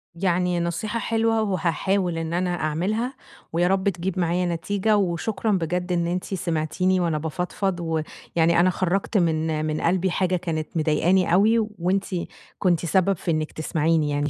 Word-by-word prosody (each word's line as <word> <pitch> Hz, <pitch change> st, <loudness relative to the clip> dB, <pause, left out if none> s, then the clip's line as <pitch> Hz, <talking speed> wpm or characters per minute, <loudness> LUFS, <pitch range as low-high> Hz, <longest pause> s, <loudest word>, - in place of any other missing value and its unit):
يعني 180 Hz, 0 st, +1 dB
نصيحة 210 Hz, +7 st, -2 dB
حلوة 225 Hz, 0 st, +1 dB
وهاحاول 185 Hz, -1 st, 0 dB
إن 165 Hz, 0 st, -3 dB
أنا 180 Hz, +1 st, 0 dB
اعملها، 200 Hz, -, -1 dB, 0.4 s
ويا 175 Hz, +1 st, +2 dB
رب 195 Hz, +1 st, +2 dB
تجيب 185 Hz, 0 st, -3 dB
معايا 175 Hz, +1 st, +1 dB
نتيجة، 200 Hz, +5 st, 0 dB
وشكرًا 200 Hz, +4 st, -1 dB
بجد 180 Hz, 0 st, -1 dB
إن 170 Hz, -1 st, +1 dB
أنتِ 180 Hz, +1 st, -1 dB
سمعتيني 180 Hz, +2 st, 0 dB
وأنا 165 Hz, -3 st, 0 dB
بافضفض، 180 Hz, +4 st, -2 dB
ويعني 165 Hz, +1 st, 0 dB
أنا 185 Hz, +1 st, +5 dB
خرّجت 185 Hz, +4 st, 0 dB
من 160 Hz, -2 st, +1 dB
من 155 Hz, 0 st, -2 dB
قلبي 185 Hz, +1 st, +1 dB
حاجة 185 Hz, 0 st, +1 dB
كانت 160 Hz, -3 st, -2 dB
مضايقاني 170 Hz, +3 st, +2 dB
أوي 220 Hz, +5 st, +5 dB, 0.2 s
وأنتِ 190 Hz, +3 st, +1 dB, 0.5 s
كنتِ 175 Hz, -3 st, +2 dB
سبب 190 Hz, +4 st, +3 dB
في 170 Hz, -, -2 dB
إنِّك 155 Hz, -1 st, -1 dB
تسمعيني 155 Hz, 0 st, 0 dB
يعني، 145 Hz, +1 st, 0 dB
175 Hz, 150 wpm, -24 LUFS, 165-190 Hz, 0.5 s, أنا